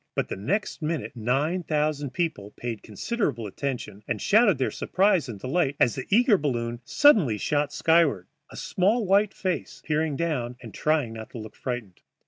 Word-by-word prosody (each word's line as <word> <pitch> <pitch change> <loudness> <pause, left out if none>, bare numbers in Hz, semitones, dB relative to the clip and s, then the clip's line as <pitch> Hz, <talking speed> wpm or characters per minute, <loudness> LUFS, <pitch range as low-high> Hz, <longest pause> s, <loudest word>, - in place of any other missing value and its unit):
But - - -1
the - - -3
next 175 - -2
minute 155 -2 -3
nine 135 +10 0
thousand 150 -3 -1
people 155 - -3
paid 120 -3 -5
considerable 205 - -2
attention 105 -2 -5
and 115 -3 -2
shouted 210 - +4
their 130 - 0
surprise 185 -7 +1
and 105 -4 -7
delight 140 - 0
as 120 - +4
the 130 - -6
eager 225 -1 +4
balloon 120 -4 -2
suddenly 200 - +4
shot 145 +5 0
skyward, 155 - +3 0.2
a - - -11
small 210 +5 +1
white 200 +2 +3
face 185 -2 -3
peering 155 -1 0
down 135 -7 -2
and 115 -4 -11
trying 150 -7 0
not 110 -1 -8
to - - -6
look 110 -1 -9
frightened. 120 -8 -5
145 Hz, 170 wpm, -26 LUFS, 120-180 Hz, 0.2 s, shouted